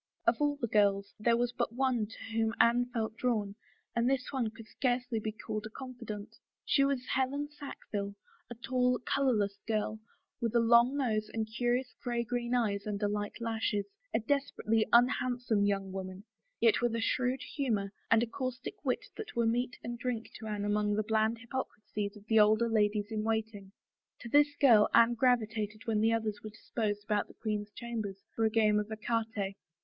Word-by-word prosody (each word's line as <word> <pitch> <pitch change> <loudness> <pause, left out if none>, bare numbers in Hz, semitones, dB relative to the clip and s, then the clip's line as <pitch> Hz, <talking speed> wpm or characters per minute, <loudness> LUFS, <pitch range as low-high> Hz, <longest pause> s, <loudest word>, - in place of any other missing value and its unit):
Of 230 - +4
all 290 0 +2
the 235 - 0
girls 200 -2 +2
there 230 +2 +3
was 240 0 +1
but 235 - -2
one 250 -4 +1
to 225 - -11
whom 225 0 +1
Anne 240 +1 +4
felt 225 -3 -3
drawn 215 -5 0 0.4
and 235 +1 +2
this 265 -1 -1
one 255 -5 0
could 225 0 -12
scarcely 245 -2 -1
be 215 0 -3
called 215 0 -5
a - - -11
confidante. 230 -4 -8 0.3
She 275 - +4
was 275 -2 0
Helen 280 +3 -1
Sackville, 210 -9 -6 0.3
a 240 - -7
tall, 250 +1 +1
colorless 210 -8 +1
girl, 215 0 -1 0.4
with 230 0 -1
a - - +6
long 235 +4 +5
nose 215 -6 0
and 220 -1 -2
curious 245 +1 0
gray 240 -1 -1
green 240 +1 -1
eyes 205 -4 0
under 205 0 -1
light 205 +1 -3
lashes, 225 -3 -1 0.3
a - - +2
desperately 225 -4 0
un 240 +1 +7
handsome 245 -5 0
young 195 -1 -1
woman, 190 0 -6 0.4
yet 230 0 +4
with 240 -1 +1
a - - 0
shrewd 250 +3 0
humor 215 -8 0 0.2
and 225 0 +5
a - - +2
caustic 255 - -5
wit - - 0
that 435 - -7
were 235 -1 +2
meat 245 +2 0
and 240 0 -5
drink 240 -2 -3
to 220 - -7
Anne 205 -1 -2
among 210 0 +1
the 215 - +1
bland 220 +1 +1
hypocrisies 215 -4 -5
of 205 - -16
the 220 0 +4
older 215 +2 +5
ladies 210 -1 +1
in 215 -1 -1
waiting. 220 -3 -2 0.5
To 235 - -7
this 290 +2 +4
girl 230 -7 +6
Anne 235 +1 +6
gravitated 220 -3 +1
when 220 -2 +1
the 225 +1 +4
others 220 -2 -1
were 215 - -5
disposed 210 -1 -3
about 205 -1 0
the - - -16
queen's 210 -2 -3
chambers 220 -5 -4 0.2
for 225 - +2
a - - +4
game 215 -1 +3
of 210 +1 -4
ecarte. 220 -3 -2
225 Hz, 185 wpm, -32 LUFS, 210-245 Hz, 0.5 s, un